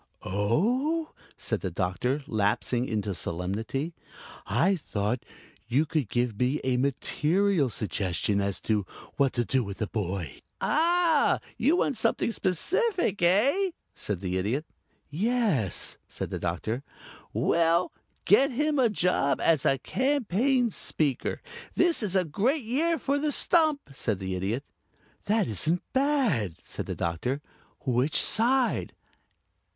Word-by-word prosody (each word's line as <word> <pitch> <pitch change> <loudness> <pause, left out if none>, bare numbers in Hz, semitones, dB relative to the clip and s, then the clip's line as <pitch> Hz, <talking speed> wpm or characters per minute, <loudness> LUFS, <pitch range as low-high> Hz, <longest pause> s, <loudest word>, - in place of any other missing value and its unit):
"Oh!" 240 - 0 0.2
said - - -2
the - - -2
Doctor, 115 +10 -1
lapsing 120 +3 0
into 105 -2 -2
solemnity. 105 - -3 0.5
"I 190 +4 +3
thought 115 - -2 0.4
you 135 +6 +2
could 150 -7 -1
give 120 -3 -1
me 130 +4 +1
a 130 -1 +1
material 150 +5 +1
suggestion 100 -2 -1
as 100 -1 -1
to 105 -2 0 0.3
what 140 -2 +3
to 120 -1 0
do 130 +1 +1
with 100 -2 -6
the 110 - -1
boy." 95 -7 -4 0.2
"Ah! 330 -1 +3 0.2
You 310 - +3
want 280 -7 0
something 225 - +1
specific, 275 - 0
eh?" 250 - +3 0.2
said 100 -4 -3
the 95 -1 -1
Idiot. 120 - -1 0.5
"Yes," 195 - 0
said - - -6
the - - -3
Doctor. 90 +8 -2 0.5
"Well 170 +1 +2 0.3
get 265 +8 +5
him 295 +3 0
a 245 -3 +4
job 180 -8 +1
as 160 -4 +3
a 135 - +3
Campaign 255 - +1
Speaker. 145 -8 -1 0.3
This 345 -5 +3
is 200 -3 -1
a 185 -1 +3
great 240 - 0
year 310 +9 +1
for 280 +1 0
the 300 0 0
stump," 310 -2 +3
said 110 -6 -1
the 95 0 -4
Idiot. 100 +8 -2 0.6
"That 215 +1 +2
isn't 155 - 0
bad," 260 - +1
said - - -6
the - - -3
Doctor. 85 - -2 0.5
"Which 130 +3 +2
side?" 250 +3 +2
155 Hz, 130 wpm, -27 LUFS, -, 0.6 s, get